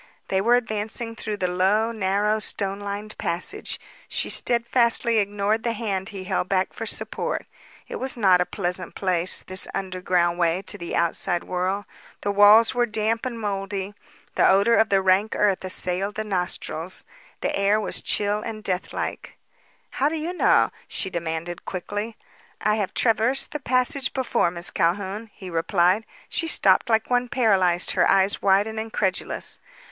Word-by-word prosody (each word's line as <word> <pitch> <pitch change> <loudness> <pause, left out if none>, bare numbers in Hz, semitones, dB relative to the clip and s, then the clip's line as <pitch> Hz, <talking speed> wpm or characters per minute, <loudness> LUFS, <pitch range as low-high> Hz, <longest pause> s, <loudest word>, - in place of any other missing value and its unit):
They 190 0 +1
were 235 +4 +4
advancing 225 0 -2
through 215 -2 -4
the 185 - 0
low, 195 +5 +2
narrow 210 0 0
stone 200 -2 0
lined 205 +1 -6
passage. 180 - -2 0.3
She - - +1
steadfastly 235 -1 +2
ignored 205 +2 0
the 235 0 -1
hand 200 -3 -3
he 195 -2 -7
held 185 0 -2
back 190 -1 0
for 225 - -5
support. - - -3 0.4
It - - -5
was 260 -1 -2
not 190 -5 +4
a 180 - 0
pleasant 180 -2 -4
place, 180 -2 0
this 185 0 -1
underground 180 -2 0
way 170 +2 +1
to - - -3
the 170 - -4
outside 170 +1 +1
world. 185 +3 -2 0.4
The 205 - -1
walls 205 +3 +6
were 245 -1 +1
damp 225 +3 -1
and 235 -2 -6
mouldy; 195 -1 -3 0.4
the - - +4
odor 200 +4 +4
of 220 -1 +4
the 195 -1 +2
rank 190 +3 +2
earth 200 -3 +1
assailed 185 +2 -1
the 215 - -2
nostrils; 180 -3 -2 0.4
the - - -1
air 200 +2 +2
was 215 - 0
chill 205 0 +1
and 215 -1 -6
deathlike. 185 -2 -4 0.5
"How 280 +3 +1
do 320 - -3
you 325 +3 -3
know?" - - +3 0.2
she 190 - -2
demanded 170 0 -4
quickly. 205 +4 -5 0.4
"I 210 - +1
have 200 -4 -3
traversed 230 +3 +1
the 300 - -4
passage 255 +1 +1
before. 260 -9 +1
Miss 170 0 +2
Calhoun," 195 +6 -1
he 185 -3 -10
replied. 180 +4 +1 0.2
She 330 - -1
stopped 195 -8 +3
like 220 +1 +1
one 245 0 +1
paralyzed, 190 -8 +2
her - - +2
eyes 195 +1 +3
wide 195 +1 +4
and 220 0 -5
incredulous. 210 -4 -2
200 Hz, 160 wpm, -24 LUFS, 185-225 Hz, 0.5 s, walls